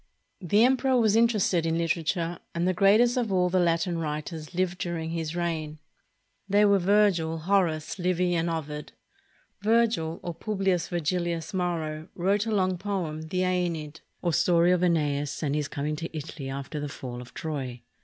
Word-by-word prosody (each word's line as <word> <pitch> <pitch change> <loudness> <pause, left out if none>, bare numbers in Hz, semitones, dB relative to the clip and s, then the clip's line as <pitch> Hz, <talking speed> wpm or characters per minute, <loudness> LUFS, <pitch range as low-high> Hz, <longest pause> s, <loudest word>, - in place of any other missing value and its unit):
The 205 +4 +3
emperor 260 +1 +3
was 220 -2 +3
interested 215 -7 +3
in 165 0 0
literature, 170 +1 -1 0.2
and 170 +1 +1
the 185 - +2
greatest 215 +7 +4
of 235 -4 0
all 180 -1 +2
the 185 +1 +2
Latin 170 0 +1
writers 155 +1 -5
lived 185 0 0
during 165 -2 -3
his 165 -1 -3
reign. 160 -3 -2 0.7
They 205 +2 +5
were 200 -1 +4
Virgil, 180 -4 +3
Horace, 165 -1 0
Livy, 180 0 +1
and 170 0 0
Ovid. 150 -2 -5 0.7
Virgil, 215 -7 +2
or 175 - -4
Publius 195 -2 -1
Virgilius 170 -1 -2
Maro, 165 -4 -2
wrote 200 +4 +1
a - - -1
long 185 -3 +1
poem, 180 -6 -3
the 185 +3 -1
"^Eneid," 170 -4 -1 0.2
or 170 -2 +1
story 170 +1 +4
of 180 -1 +2
^neas 145 -4 0
and 140 -2 0
his 150 -1 -1
coming 150 +2 -3
to 165 0 -5
Italy 145 -2 -6
after 140 +3 -5
the 145 0 -4
fall 125 -3 -7
of 125 - -13
Troy. 135 -6 -4
170 Hz, 165 wpm, -27 LUFS, 155-190 Hz, 0.7 s, They